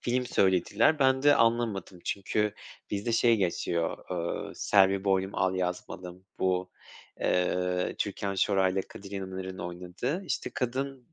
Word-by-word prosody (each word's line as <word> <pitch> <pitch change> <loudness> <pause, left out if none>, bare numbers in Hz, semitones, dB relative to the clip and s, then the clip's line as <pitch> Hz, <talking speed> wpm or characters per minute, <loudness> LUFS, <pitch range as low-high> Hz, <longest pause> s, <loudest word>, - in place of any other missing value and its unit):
film 125 +1 0
söylediler. 100 - +3
Ben 130 -1 +3
de 145 0 +7
anlamadım. 115 -6 +1
Çünkü 105 +1 -1 0.4
bizde 105 +3 -1
şey 115 0 +4
geçiyor, 85 -3 -1
ııı, 85 -1 -3
“Selvi 95 -1 +3
Boylum 95 0 +1
Al 95 0 +1
Yazmalım” 90 0 -4
bu, 90 0 0 0.5
eee, 90 0 +1
Türkan 100 -1 -2
Şoray'la 95 -1 +2
Kadir 100 0 -11
İnanır'ın 95 -1 -5
oynadığı. 90 - -4
İşte, - - -2
kadın 135 +1 -3
95 Hz, 125 wpm, -29 LUFS, 90-115 Hz, 0.5 s, de